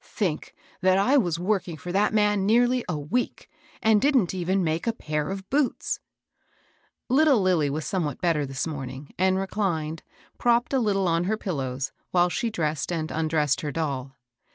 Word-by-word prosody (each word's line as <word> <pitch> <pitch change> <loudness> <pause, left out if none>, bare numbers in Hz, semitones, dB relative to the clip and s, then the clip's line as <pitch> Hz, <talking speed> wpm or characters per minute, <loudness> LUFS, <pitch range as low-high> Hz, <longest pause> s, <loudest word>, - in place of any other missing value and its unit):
"Think 175 -8 -3 0.3
that 185 0 +4
I 245 +9 +3
was 175 - +1
working 180 -2 -1
for 175 +4 -6
that 200 +3 +2
man 210 -2 +2
nearly 245 +4 +3
a 165 - -1
week, 155 +13 -2 0.4
and 220 -2 +4
didn't 260 - +3
even 185 +1 0
make 160 +4 -1
a 230 - +2
pair 150 -6 -3
of 195 0 -5
boots! 280 -1 0 0.5
" - - -37 0.3
Little 275 -1 +4
Lilly 180 -6 +2
was 150 +2 -3
somewhat 165 -7 -2
better 165 -4 +1
this 135 -1 -3
morning, 135 -3 -6
and 190 0 +3
reclined, 175 -6 -2 0.4
propped 240 +2 +2
a 265 - +3
little 195 -5 +1
on 165 +1 +1
her 215 +3 0
pillows, 135 - -3 0.2
while 175 0 +3
she 230 +6 -1
dressed 155 -6 -2
and 160 -2 -2
undressed 155 -3 +1
her 150 - -3
doll. 135 -4 -3
180 Hz, 175 wpm, -26 LUFS, 155-210 Hz, 0.5 s, that